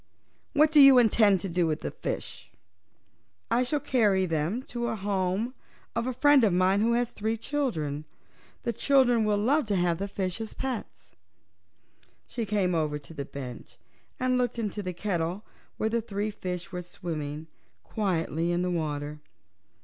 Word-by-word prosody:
"What 305 +1 +4
do 305 - +6
you 275 -2 +9
intend 215 -5 +5
to - - -3
do 175 0 +1
with 155 -1 -1
the - - -4
fishes?" - - -5 1.1
"I 245 - +3
shall 270 +4 0
carry 210 -9 +2
them 165 +8 -1
to 240 -2 -4
the 225 - -1
home 200 +3 -1 0.4
of 230 +1 -1
a - - 0
friend 290 +1 +5
of 210 - +4
mine 185 +3 +3
who 230 +2 +3
has 240 0 0
three 220 +2 -2
children. 170 - -2 0.6
The 235 - -1
children 245 -2 +3
will 210 -1 +2
love 260 +6 +2
to 205 - +1
have 175 -2 +1
the 200 - -2
fishes 200 +2 -4
for - - -20
pets." 260 -4 -5 1.1
She 230 -3 -4
came 195 -3 +1
over 155 -3 0
to 150 +3 -12
the 140 -3 -5
bench 125 -4 -9 0.4
and 255 0 +1
looked 245 -1 -1
into 210 -2 -2
the 185 -2 -4
kettle, 175 0 -2 0.3
where 220 - 0
the 230 +1 0
three 210 -1 -3
fishes 180 -1 -5
were 180 -1 -4
swimming 155 -4 -5 0.4
quietly 170 -5 -1
in 175 +1 0
the 180 - -1
water. 150 -3 -3
200 Hz, 170 wpm, -28 LUFS, 175-235 Hz, 1.1 s, you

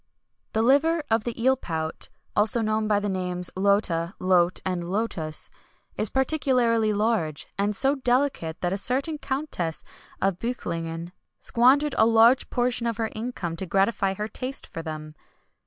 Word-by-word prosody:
The 220 - +2
liver 300 +6 +3
of 225 -1 +2
the 240 -1 -4
eel 260 +3 +4
pout 160 -9 -4 0.3
(also 215 +3 +3
known 215 0 0
by 210 -1 +3
the 205 - -3
names, 180 -2 -2
lota, 190 -3 +1
lote, 180 -1 +3
and 175 -2 -2
lotus) 185 -7 -1 0.4
is 215 - 0
particularly 250 -5 +2
large, 205 -8 0
and 205 +1 0
so 270 +6 +2
delicate 250 - 0
that 180 +1 0
a 200 - -1
certain 275 +8 +1
Countess 265 - -3 0.4
of 195 -2 0
Beuchlingen 170 -8 -4 0.3
squandered 270 +5 +4
a 220 - +6
large 230 +3 +5
portion 245 -1 0
of 230 -2 -2
her 225 -1 -2
income 215 -7 -4
to 190 - -4
gratify 195 +1 +1
her 210 +2 -3
taste 255 +4 -4
for 165 - -7
them. 155 -1 -7
215 Hz, 155 wpm, -25 LUFS, 180-245 Hz, 0.4 s, a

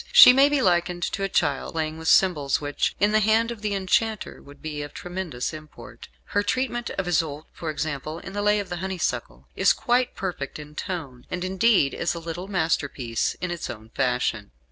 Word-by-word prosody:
She 485 - +10
may 275 +2 +6
be 290 -3 +1
likened 175 -1 +1
to - - -2
a 195 - 0
child 145 -7 0
playing 160 -1 -2
with 160 - -6
symbols 150 -9 +4
which, 145 -1 -1
in 205 +1 +3
the 215 - +4
hand 220 +2 +3
of 230 -3 -8
the 210 -1 -1
enchanter, 210 +3 0
would 145 0 -15
be 150 -2 -5
of 145 - -8
tremendous 175 -8 -4
import. 155 -1 -11 0.3
Her 205 - +3
treatment 240 +2 -1
of 190 -2 -1
Isoude, 155 -3 0
for 165 - -5
example, 155 0 -3
in 195 - -9
"The 205 - -2
Lay 210 0 +3
of 200 -2 -5
the 175 - -3
Honeysuckle," 125 - -3
is - - +4
quite 245 +1 +1
perfect 175 -7 -4
in 150 0 -10
tone, 150 -8 -6
and, 180 -1 -3
indeed, 190 -5 +3
is 170 - -1
a - - -4
little 170 +3 -6
masterpiece 145 - -1
in 180 -1 -2
its 175 - -4
own 110 0 -8
fashion. 125 - -1
175 Hz, 200 wpm, -25 LUFS, 150-205 Hz, 0.3 s, She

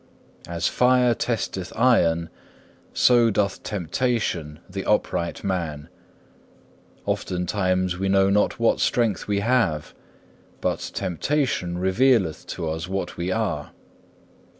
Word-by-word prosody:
As 85 0 -1
fire 125 -1 +3
testeth 105 -6 -3
iron, 85 -9 +3 0.6
so 120 -2 +4
doth 100 -2 0
temptation 95 -5 -2
the - - -5
upright 85 0 0
man. 85 -6 -3 1.2
Oftentimes 90 0 -1
we 95 0 0
know 95 0 +4
not 105 +1 +1
what - - +2
strength 115 -6 +1
we 100 -1 0
have; 115 -10 +1 0.7
but - - -1 0.2
temptation 90 - -1
revealeth 95 - +2
to 80 - -4
us 80 +2 -3
what 95 -1 -3
we 85 +2 -2
are. - - -2
95 Hz, 105 wpm, -24 LUFS, 85-115 Hz, 1.2 s, so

